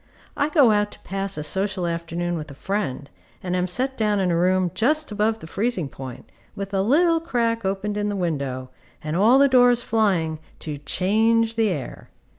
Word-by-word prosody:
I 285 - 0
go 285 -7 +5
out 210 0 +2
to - - -14
pass 195 0 -2
a 150 - -3
social 190 +3 -1
afternoon 170 +1 -3
with 155 -2 -6
a 140 - -10
friend, 190 -6 -3 0.4
and 180 -1 -2
am 180 0 0
set 260 +8 -1
down 210 -2 +1
in 185 -2 +1
a - - +1
room 180 +1 +2
just 305 +4 +1
above 215 +1 0
the 215 - -11
freezing 195 - -1
point, 130 -2 -9 0.3
with 200 -1 -6
a 195 - +2
little 330 - +3
crack 235 -8 -1
opened 200 +2 -2
in 210 0 -1
the 205 - -2
window, 140 -8 -3 0.3
and 155 +1 -3
all 220 +8 +5
the 280 +1 +6
doors 245 -2 +4
flying, 180 -8 +1 0.2
to 150 -2 -6
change 225 +8 +1
the 225 -2 +2
air. 150 -8 -6
195 Hz, 195 wpm, -23 LUFS, 170-230 Hz, 0.4 s, the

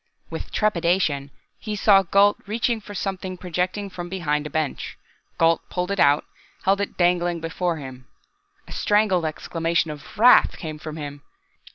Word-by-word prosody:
With - - -6
trepidation, 170 -8 +1 0.3
he 215 -1 -4
saw 200 -1 +5
Gault 200 +3 +4
reach 230 +3 0
for 205 0 -10
something 190 -2 -4
projecting 180 +3 -2
from 175 -2 -7
behind 150 -5 -1
a - - -9
bench. 155 -1 -3 0.4
Gault 165 0 +3
pulled 180 +1 -2
it 200 - -2
out, 145 +1 +4 0.4
held 195 +1 +2
it 200 - -4
dangling 175 -1 +2
before 165 +1 -2
him. 130 -3 -10 0.6
A - - -13
strangled 205 -5 +2
exclamation 165 +1 -1
of 150 +3 -11
wrath 240 +4 +6
came 155 -3 -6
from 155 0 -7
him. 145 -1 -7
175 Hz, 155 wpm, -23 LUFS, 155-195 Hz, 0.6 s, wrath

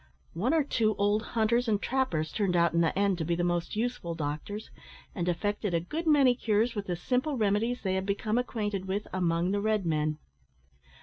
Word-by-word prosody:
One 200 +10 0
or 315 - +3
two 220 -6 +1
old 205 +2 +2 0.2
hunters 235 +2 +2
and 210 -2 +2
trappers 210 -13 -1
turned 195 -4 0
out 170 -1 +3
in 170 - +3
the 165 +2 +1
end 200 -3 +2
to - - 0
be 170 +2 0
the 175 - -1
most 175 +1 -1
useful 220 -7 -2
doctors, 155 +7 -5 0.4
and 175 -2 -1
effected 205 +1 -1
a - - +3
good 315 - -4
many 280 -5 +6
cures 230 0 +1
with 205 -3 -4
the 175 - -1
simple 255 - -1
remedies 220 +3 +1
they 190 -2 0
had 190 +1 -1
become 215 +3 0
acquainted 205 -6 -2
with 200 +2 -2
among 175 -1 +1
the 200 0 0
red 215 -2 +1
men. 155 -1 0
205 Hz, 200 wpm, -29 LUFS, 175-230 Hz, 0.4 s, many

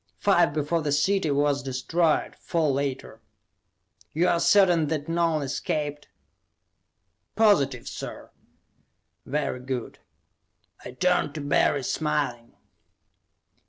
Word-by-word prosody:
"Five 175 -5 +3
before 155 +3 -1
the 150 -2 -2
city 160 +4 +1
was 145 0 +1
destroyed, 150 +5 0
four 160 -4 -1
later." 135 -1 -4 0.9
"You 170 +4 +2
are 170 - +2
certain 175 -4 +4
that 150 -1 -3
none 165 -2 0
escaped?" 145 +2 -3 1.3
"Positive, 140 - +2
sir." - - -8 1.0
"Very 140 -2 -2
good." 125 -1 -5 0.8
I 125 - -9
turned 180 +5 0
to 155 - -4
Barry, 140 0 +1
smiling. 130 -5 -2
150 Hz, 100 wpm, -25 LUFS, 140-170 Hz, 1.3 s, certain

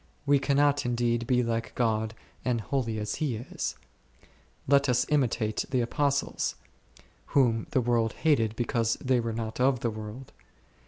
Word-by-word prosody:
We 140 0 +4
cannot 145 +1 +2
indeed 120 -1 0
be 125 -1 +3
like 115 -1 -2
God 110 -2 0 0.3
and 125 -2 0
holy 115 -1 -2
as 105 -1 -3
He 140 -6 0
is; 115 +3 -4 0.9
let 140 0 +4
us 125 - +3
imitate 120 -7 +1
the 130 -2 +1
Apostles, 140 +3 0 0.8
whom 115 -4 +3
the 130 - +2
world 115 -2 +1
hated 115 -9 +1
because 115 -1 0
they 130 -1 +1
were 115 -1 -2
not 110 0 -4
of 130 -1 +3
the 115 - 0
world. 110 +4 -8
120 Hz, 150 wpm, -28 LUFS, 115-135 Hz, 0.9 s, We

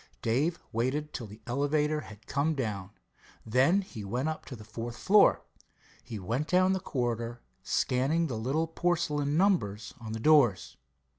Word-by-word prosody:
Dave 145 +10 +1
waited 135 +6 -1
till 115 - -5
the 105 +2 -13
elevator 150 +4 0
had 105 -4 -13
come 150 +3 0
down. 105 -8 -3 0.6
Then 135 - +3
he 115 - -8
went 125 +9 -1
up 155 - -5
to 130 - -8
the 110 - -11
fourth 115 +2 -6
floor. 205 +8 +5 0.6
He 110 - -7
went 115 +10 -2
down 185 +2 +3
a - - -1
corridor, 120 -5 -3 0.2
scanning 140 +7 +1
the 130 -7 -3
little 135 +9 0
porcelain 160 -3 0
numbers 165 - +1
on 110 -1 -6
the 110 - -4
doors. 130 - +4
130 Hz, 155 wpm, -29 LUFS, 115-155 Hz, 0.6 s, floor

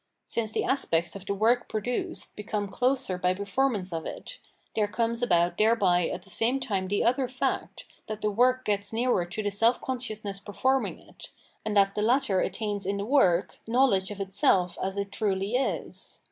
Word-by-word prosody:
Since 220 -2 -2
the - - 0
aspects 175 -12 0
of 195 -1 -9
the 200 - -1
work 230 +4 +2
produced 245 - -3
become 210 0 -3
closer 245 -4 0
by 180 0 +1
performance 200 -2 -1
of 165 -1 -3
it, - - -8 0.4
there 210 -2 +2
comes 230 +2 -1
about 175 -6 +2
thereby 200 -6 +3
at - - -5
the 195 - -12
same 240 +8 +1
time 200 -8 -2
the 200 +2 0
other 255 +2 +2
fact, 255 +1 -3 0.2
that 215 0 -5
the 210 - +1
work 255 +4 +2
gets 200 -1 -1
nearer 225 -5 +1
to 215 +5 -4
the 205 - -1
self 225 +5 +3
consciousness 215 -6 -3
performing 260 +6 0
it, - - -13 0.3
and 215 -1 -1
that 195 0 +4
the 210 - -2
latter 240 -3 +2
attains 205 -3 -2
in 200 0 0
the 200 - -3
work 200 -9 +2
knowledge 225 -6 +3
of 205 -1 -7
itself 190 -2 +2
as 195 +1 -2
it 200 0 -3
truly 200 +1 -1
is. 265 - -3
210 Hz, 185 wpm, -27 LUFS, 195-245 Hz, 0.4 s, that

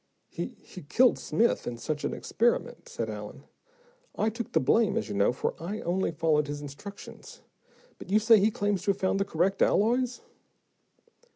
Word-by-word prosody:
"He - - -6
he 185 - -11
killed 240 - +3
Smith 235 +2 +1
in 120 - -4
such 150 +4 -4
an - - -1
experiment," 240 - -1
said 470 - -3
Allen. - - -8 0.7
"I 220 +1 +1
took 230 +1 -6
the - - +4
blame, 205 - +2
as - - -2
you - - -3
know, 100 +2 +3
though 125 - -2
I 195 +6 -5
only 180 +2 0
followed 155 -2 +1
his 145 0 -4
instructions. 145 +8 -10 0.6
But - - -10
you 205 - +4
say 220 0 +6
he 205 +3 +4
claims 205 -3 -1
to 200 - +2
have - - -14
found 190 +1 +1
the 195 - +1
correct 190 +1 0
alloys?" 245 +4 +2
195 Hz, 180 wpm, -28 LUFS, 155-220 Hz, 0.7 s, say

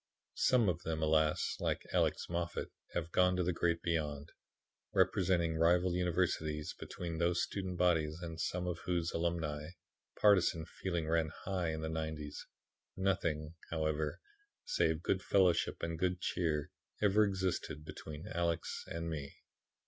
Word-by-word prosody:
"Some 125 -4 +4
of 85 -2 0
them, 80 -2 -2
alas! 80 0 +2
like - - -1
Alex - - +2
Moffat, 85 0 -3 0.2
have 85 -1 -2
gone 90 0 +4
to 90 - +1
the 90 +1 +1
Great 85 0 +1
Beyond. 75 -4 -1 0.6
Representing 90 -3 +3
rival 90 +2 +4
universities, 85 -4 0
between 85 -2 -5
whose 85 0 +2
student 95 -3 -3
bodies 80 -3 +2
and 85 -2 -5
some 90 0 -1
of 90 -1 -2
whose 85 -2 0
alumni, 80 -3 -1 0.5
partisan 90 -6 +4
feeling 85 -1 -3
ran 80 -1 +2
high 95 -3 -1
in 80 0 -3
the 80 - -2
'90's, 80 -2 -4 0.5
nothing, 85 -5 0 0.2
however, 80 -1 -1 0.5
save 80 - +1
good 95 - +1
fellowship 90 -3 +2
and 85 -1 -2
good 90 0 +1
cheer 80 -5 -1 0.3
ever 105 +1 +5
existed 95 -6 -1
between 80 +1 -8
Alex 85 -4 -1
and 85 0 -4
me. 75 -4 -5
85 Hz, 140 wpm, -35 LUFS, 80-90 Hz, 0.6 s, ever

